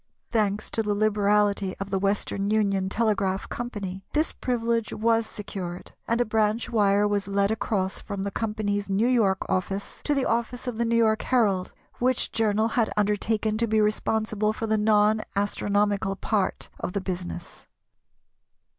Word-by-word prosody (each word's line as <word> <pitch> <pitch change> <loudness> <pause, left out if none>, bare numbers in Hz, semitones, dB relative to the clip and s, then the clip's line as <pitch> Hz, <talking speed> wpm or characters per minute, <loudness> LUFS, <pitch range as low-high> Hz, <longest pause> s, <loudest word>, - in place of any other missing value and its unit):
Thanks 210 -2 0
to 225 - 0
the 210 -1 0
liberality 205 -2 +2
of 195 0 -5
the 195 - +1
Western 200 0 -1
Union 200 -3 +1
Telegraph 200 -3 0
Company 200 -6 -5
this 310 +2 +1
privilege 230 -2 -1
was 225 0 +1
secured, 185 -4 -6 0.2
and 230 +1 +1
a 245 - +3
branch 215 +1 0
wire 205 -2 +3
was 205 -1 0
led 200 +1 +1
across 195 -3 -1
from 200 -2 -5
the 200 - -3
Company's 205 -2 -2
New 195 +4 +2
York 210 -7 +2
office 195 +2 -2
to 295 - +2
the 275 - +1
office 235 +2 -1
of 240 -3 -4
the 235 - +2
New 230 0 +1
York 220 -1 +3
Herald, 205 -8 +1 0.3
which 255 0 +1
journal 220 0 +1
had 230 -1 +1
undertaken 210 +1 +1
to 230 - +2
be 220 0 +2
responsible 215 0 +1
for 225 - -4
the 220 0 +1
non 210 0 +3
astronomical 205 -1 0
part 200 -1 -1
of 180 - -4
the 200 - -1
business. 180 -2 -6
210 Hz, 160 wpm, -26 LUFS, 200-225 Hz, 0.3 s, a